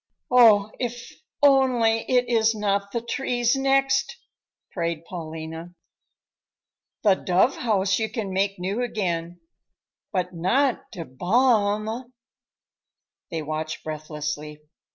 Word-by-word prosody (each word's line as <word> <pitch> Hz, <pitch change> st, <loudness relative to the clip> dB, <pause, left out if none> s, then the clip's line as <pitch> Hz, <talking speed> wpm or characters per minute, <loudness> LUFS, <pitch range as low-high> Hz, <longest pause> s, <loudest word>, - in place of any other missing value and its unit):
"Oh, 215 Hz, -4 st, +6 dB
if 240 Hz, -1 st, -5 dB, 0.3 s
only 255 Hz, -5 st, +4 dB
it 250 Hz, -1 st, +3 dB
is 225 Hz, -1 st, +2 dB
not 200 Hz, -1 st, -1 dB
the 235 Hz, -, -2 dB
trees 240 Hz, 0 st, 0 dB
next!" 270 Hz, -, +1 dB, 0.5 s
prayed 170 Hz, -2 st, -3 dB
Paulina. 160 Hz, 0 st, -7 dB, 1.3 s
"The 205 Hz, -3 st, +6 dB
dove 190 Hz, +7 st, +1 dB
house 195 Hz, -4 st, +1 dB
you 220 Hz, -1 st, -1 dB
can 205 Hz, -6 st, -4 dB
make 195 Hz, +1 st, 0 dB
new 190 Hz, +6 st, -2 dB
again, 175 Hz, -7 st, -3 dB, 0.7 s
but 180 Hz, -1 st, -2 dB
not 235 Hz, +11 st, 0 dB
die 170 Hz, -, -6 dB
Bäume." 215 Hz, -, +1 dB, 1.2 s
They 160 Hz, -2 st, -4 dB
watched 155 Hz, +1 st, -4 dB
breathlessly. 150 Hz, -1 st, -5 dB
205 Hz, 105 wpm, -24 LUFS, 170-240 Hz, 1.3 s, Oh